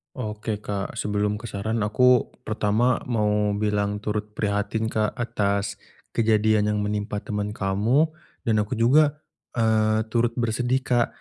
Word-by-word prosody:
Oke, 105 -2 -4
Kak. 100 -1 -4
Sebelum 105 0 0
ke 115 +2 -7
saran 110 +2 -1
aku 125 +4 +3 0.2
pertama 110 +3 +1
mau 105 -3 +1
bilang 105 -1 0
turut 105 0 -3
prihatin, 105 +1 -1
Kak, 110 -1 0
atas 100 -4 -1 0.4
kejadian 110 -1 +3
yang 105 - 0
menimpa 105 0 -2
temen 105 0 -3
kamu 105 +10 +2 0.4
dan 110 - +3
aku 105 - -5
juga, 145 +5 +4 0.4
eee, 110 -1 +2
turut 115 +1 +1
bersedih, 120 +3 0
Kak, 120 -1 +2
105 Hz, 135 wpm, -24 LUFS, 105-115 Hz, 0.4 s, juga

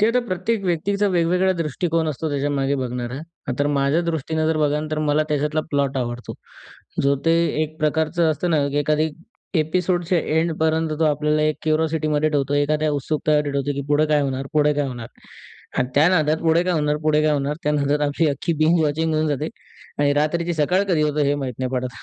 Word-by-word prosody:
ते 215 +2 +4
तर 250 - +4
प्रत्येक 200 +3 -1
व्यक्तींचा 195 +4 0
वेगवेगळा 180 +1 +2
दृष्टिकोन 165 0 -1
असतो 155 +2 -3
त्याच्यामागे 140 -1 0
बघणारा. 125 -1 -4 0.3
अ, - - -1
तर 145 - +2
माझ्यादृष्टीनं 160 +2 0
जर 160 0 +1
बघाल 150 0 0
तर 155 - -1
मला 150 +1 +3
त्याच्यातला 150 +1 0
प्लॉट 140 -1 0
आवडतो. 120 -1 -4 0.7
जो 140 0 +3
ते 165 - +4 0.3
एक 155 0 -5
प्रकारचं 160 +2 +1
असतं 175 +3 -1
ना, 150 -3 +2
की 140 - -4
एखादी 150 +2 +1 0.5
एपिसोडच्या 175 +2 0
एंडपर्यंत 160 0 0
तो - - +4
आपल्याला 150 0 +1
एक 155 0 +1
क्युरॉसिटीमध्ये 155 -1 +1
ठेवतो, 145 -1 0
एखाद्या 150 +1 +1
उत्सुकतामध्ये 150 +1 0
ठेवतो, 140 0 -1
की 140 - -3
पुढे 150 +1 +3
काय 150 -1 +2
होणार? 135 -1 -2
पुढे 150 -1 +3
काय 145 -1 0
होणार? 120 -3 -7 0.7
आणि 125 - +1
त्या 150 +4 +5
नादात 155 -4 +2
पुढे 165 +1 +3
काय 180 - +1
होणार? 150 -2 +1
पुढे 155 0 +2
काय 155 0 +3
होणार? 145 0 -1
त्या 150 - +1
नादात 145 0 +1
आमची 150 +3 +1
अख्खी 145 +4 -1
बिंज 165 +2 +3
वॉचिंग 155 +2 0
होऊन 155 0 +1
जाते 150 +2 -1 0.5
आणि 145 0 +3
रात्रीची 170 +4 0
सकाळ 180 +6 +2
कधी 165 -5 +2
होतं 150 0 0
हे 140 +1 +2
माहीत 135 -3 -4
नाही 130 -1 -2
पडत. 130 0 -1
150 Hz, 190 wpm, -22 LUFS, 145-160 Hz, 0.7 s, त्या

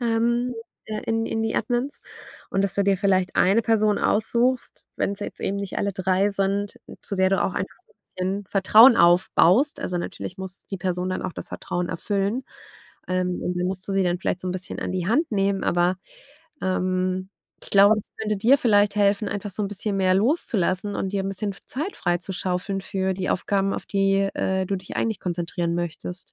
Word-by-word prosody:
ähm, 235 +1 +1 0.3
äh, 215 -1 -4
in 225 0 0
in 225 0 -2
die 225 - -1
Admins 245 +5 -1 0.5
und 195 - +1
dass 195 -1 -1
du 200 - +2
dir 200 -1 +2
vielleicht 190 -2 +1
eine 205 +5 +4
Person 215 -2 +2
aussuchst, 240 +4 +1
wenn's 200 0 -2
jetzt - - -6
eben 200 - -1
nicht 200 -1 -4
alle 200 -1 -1
3 190 +2 +1
sind, 200 +1 -1 0.2
zu - - -5
der 190 0 +2
du 195 - +2
auch 185 - -1
einfach 190 - -4
so - - -21
'n - - -52
bisschen 190 +2 -3
Vertrauen 220 +5 +7
aufbaust. 175 - +4
Also, 180 -1 -2
natürlich 175 - -6
muss 190 0 -7
die 195 - -5
Person 180 0 -1
dann 185 - -3
auch 185 - -4
das - - -8
Vertrauen 175 0 -3
erfüllen. 200 +7 -1 0.6
Ähm, 180 -1 -1
und 180 0 -2
dann 180 - 0
musst 185 0 -3
du 195 - -1
sie 195 - +2
dann 175 0 0
vielleicht 180 - -2
so 185 - -4
'n - - -1
bisschen 185 0 -3
an - - -3
die 180 -1 -2
Hand 295 +7 +2
nehmen, 195 -1 +1
aber, 175 +1 +2 0.7
ähm, 185 0 -1 0.4
ich - - -5
glaube, 200 +2 +7
das 210 - -3
könnte 215 -1 -1
dir 245 +8 +4
vielleicht 205 -4 +3
helfen, 205 +1 +2
einfach 205 0 -4
so 210 +3 -3
'n 200 - -1
bisschen 205 0 -1
mehr 185 -1 +3
loszulassen 205 - +1
und 190 +1 -3
dir 200 - 0
'n - - -2
bisschen 200 +1 -2
f 190 - -15
Zeit 310 +10 -4
freizuschaufeln 185 +2 -2
für 190 -1 -1
die 185 0 -2
Aufgaben, 195 +1 0
auf - - -6
die, 195 0 +2
äh, 190 0 0
du 195 - -1
dich 185 0 -8
eigentlich 220 -3 -1
konzentrieren 175 -1 -2
möchtest. 175 +1 -4
195 Hz, 205 wpm, -24 LUFS, 185-210 Hz, 0.7 s, Vertrauen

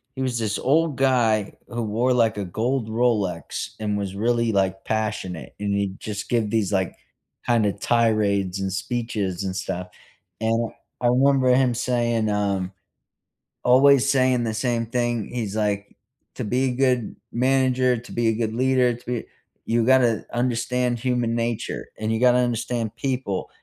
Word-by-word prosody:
he 130 - -4
was 125 -3 -1
this 105 -2 -1
old 155 +1 +2
guy 115 -6 +2
who 120 -1 -4
wore, 115 +4 +1
like, 115 -4 +2
a 100 - -2
gold 115 +5 -1
Rolex 110 -7 -1
and 105 -1 -1
was 100 -1 -4
really, 115 +2 +1
like, 95 -1 0
passionate, 105 -6 -3
and 100 -1 -1
he'd 100 -1 -2
just 105 -1 -5
give 115 -3 +1
these, 105 -3 0
like, 95 -2 0 0.5
kind 115 -3 +3
of 100 0 -1
tirades 105 -5 +1
and 95 -1 -2
speeches 100 -2 -2
and 95 -1 -3
stuff, 90 -1 -4 0.5
and 115 +1 0
I - - -25 0.2
I 120 - +2
remember 130 +1 +4
him 125 -2 +3
saying, 120 -2 0
um, 100 -3 -1 0.9
always 135 +1 +5
saying 130 -2 +3
the 115 -2 -1
same 115 +1 -1
thing. 120 -2 -1
He's 110 -5 -3
like, 105 -2 -2 0.4
"To - - -5
be 125 +5 0
a 130 -2 0
good 125 -3 +1 0.2
manager, 130 0 +2
to 120 +1 -10
be 120 -1 0
a - - +3
good 110 0 -2
leader, 130 0 +2
to 120 - -15
be 120 -2 -2 0.4
you 115 0 +1
gotta 125 -3 +3
understand 125 0 0
human 120 -1 0
nature, 115 -1 -3
and 110 0 -1
you 110 - 0
gotta 125 0 +5
understand 120 -2 -1
people, 125 -8 -2
115 Hz, 165 wpm, -23 LUFS, 105-125 Hz, 0.9 s, always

